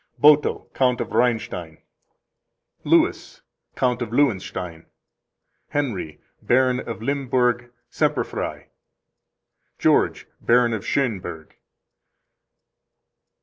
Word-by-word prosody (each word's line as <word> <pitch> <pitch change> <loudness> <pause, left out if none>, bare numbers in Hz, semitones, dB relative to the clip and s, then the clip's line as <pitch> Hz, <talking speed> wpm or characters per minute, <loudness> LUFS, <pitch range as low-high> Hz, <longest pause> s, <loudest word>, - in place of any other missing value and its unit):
Boto, 150 0 +4
Count 125 -2 +2
of - - -3
Reinstein. 100 -9 -1 1.1
Louis, - - +1 0.3
Count 125 -1 0
of 120 - -2
Lewenstein. 95 - -1 0.8
Henry, 110 - -3 0.2
Baron 125 0 +2
of 115 -2 -6
Limburg, 125 -3 0 0.2
Semperfrei. - - -2 1.1
George, - - +2 0.2
Baron 120 0 +3
of 110 - -3
Schoenburg. 90 - -2
120 Hz, 75 wpm, -23 LUFS, 95-130 Hz, 1.1 s, Boto